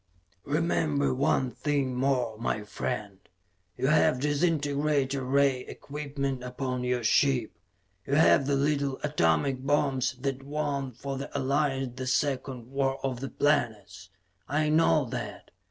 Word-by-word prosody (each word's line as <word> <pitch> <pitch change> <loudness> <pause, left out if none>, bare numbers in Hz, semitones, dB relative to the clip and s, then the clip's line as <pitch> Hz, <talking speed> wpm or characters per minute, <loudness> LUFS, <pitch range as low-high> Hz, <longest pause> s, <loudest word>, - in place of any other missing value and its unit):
"Remember, 150 -2 +1
one 130 -1 +1
thing 140 -3 -1
more, 125 -3 0
my 105 -2 -1
friend: 105 -1 -4 0.6
you - - -1
have 150 -1 +4
disintegrator 145 -2 +1
ray 135 0 +2
equipment 140 -3 -4
upon 125 0 -3
your 125 -1 0
ship. 125 0 +2 0.6
You 140 - +1
have 145 -3 +5
the 140 - +2
little 140 -1 0
atomic 130 - +1
bombs 135 -3 +1
that 135 -1 -2
won 140 -1 -2
for 135 +3 -5
the 140 - -5
Alliance 135 -1 0
the 130 - -3
Second 130 -2 -1
War 135 -1 0
of 130 -3 -2
the 135 +1 -4
Planets. 120 -9 -1 0.4
I 150 +1 +1
know 155 -1 +4
that. 120 - -6
135 Hz, 130 wpm, -28 LUFS, 130-145 Hz, 0.6 s, have